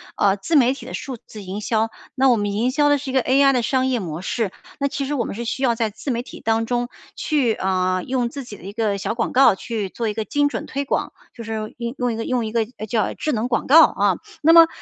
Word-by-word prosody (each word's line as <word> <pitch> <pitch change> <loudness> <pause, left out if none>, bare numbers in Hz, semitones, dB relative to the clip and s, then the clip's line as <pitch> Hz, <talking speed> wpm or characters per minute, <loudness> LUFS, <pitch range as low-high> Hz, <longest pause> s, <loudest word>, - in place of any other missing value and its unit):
呃， 195 -1 +3
自 205 +12 -2
媒 260 -3 +5
体 275 - -10
的 - - -8
数 270 -3 -5
字 215 -1 -12
营 195 +2 -5
销， 220 +1 0 0.3
那 265 0 +4
我 245 - +5
们 205 -1 -1
营 225 +5 0
销 290 +2 +3
的 290 - +4
是 275 0 -6
一 - - -7
个 265 - +3
AI 275 +2 +4
的 250 - +2
商 260 +3 +1
业 255 -2 +1
模 170 -4 -5
式， 205 +1 -2 0.3
那 280 - +1
其 275 0 -3
实 285 - -3
我 245 -6 0
们 - - -5
是 235 +2 -5
需 260 +4 -3
要 240 -3 +3
在 225 -1 0
自 215 +7 -7
媒 235 -1 -1
体 - - -11
当 225 0 +1
中 245 +1 -1 0.3
去， 275 -7 +1
嗯， 185 -2 0
用 250 -2 0
自 275 +2 -7
己 215 -4 -10
的 - - -17
一 195 +2 -7
个 215 -2 0
小 195 - -2
广 230 0 -2
告 250 -5 +6
去 210 -1 -4
做 230 +4 -3
一 - - -2
个 220 0 -3
精 290 +3 +1
准 - - -4
推 280 +1 -3
广， - - -1 0.2
就 230 - -9
是 220 -1 -5
用 235 +1 -4
用 245 -2 0
一 - - -4
个 225 - -3
用 250 -3 0
一 215 - -4
个， 230 0 +1 0.2
诶， 215 - -5
叫 220 +1 0
智 305 - -2
能 230 -1 -1
广 240 -3 -1
告， 315 +3 +7
嗯。 200 -3 +2 0.2
那 325 +2 +6
么， 330 -1 +9
235 Hz, 310 characters per minute, -22 LUFS, 215-265 Hz, 0.3 s, 么